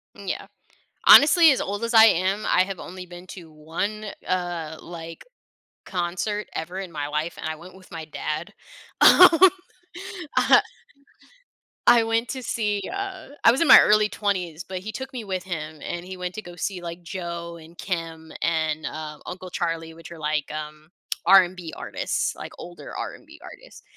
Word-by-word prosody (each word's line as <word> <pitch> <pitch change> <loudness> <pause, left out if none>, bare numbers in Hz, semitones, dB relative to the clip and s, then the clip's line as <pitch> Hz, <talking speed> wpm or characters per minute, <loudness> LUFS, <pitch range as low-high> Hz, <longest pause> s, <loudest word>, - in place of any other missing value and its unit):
Yeah, - - -5 0.6
honestly, 320 +2 +8
as 265 - +1
old 205 +3 -4
as 230 +1 -2
I 220 -1 +9
am, 195 0 +2
I - - +4
have 195 -2 -6
only 185 +1 -8
been 175 +1 -12
to 170 -3 -11
1, 170 +8 -4 0.2
uh, 175 -4 -3
like 165 -1 -9 0.6
concert 185 +4 -3
ever 175 +4 -5
in 190 -3 -6
my 145 -2 -4
life, 155 +3 -3
and - - -6
I 160 - -4
went 175 +4 -13
with 190 -1 -17
my 165 -2 -7
dad. 155 +1 -5 0.5
Um, 365 - +9 1.1
uh, - - +6 1.3
I 235 -1 +7
went 225 +1 0
to 260 -2 -5
see, 210 -4 -1
uh 390 -4 -6
I - - +8
was 260 - -1
in 335 - +3
my - - +11
early 210 0 +4
20s, 180 -7 -2
but 185 -1 -6
he 210 +4 -7
took 265 +3 -7
me 245 -3 -5
with 185 -3 -4
him, 160 -4 -6
and 175 0 -5
he 185 0 -8
went 180 0 -5
to 215 - -5
go 175 -3 -12
see, 180 +1 -4
like, 170 0 -7
Joe 170 -1 -6
and 165 +1 -15
Kem 165 -3 -5
and, 160 -2 -1
uh, 155 -1 -6
Uncle 185 0 -8
Charlie, 165 -2 -3
which 165 0 -13
are 170 - -10
like, 150 -1 -2
um, 155 0 -8 0.4
R&B 180 -2 +4
artists, - - -2
like - - -9
older 175 0 -10
R&B - - -8
artists. - - -13
175 Hz, 175 wpm, -24 LUFS, 165-205 Hz, 1.3 s, my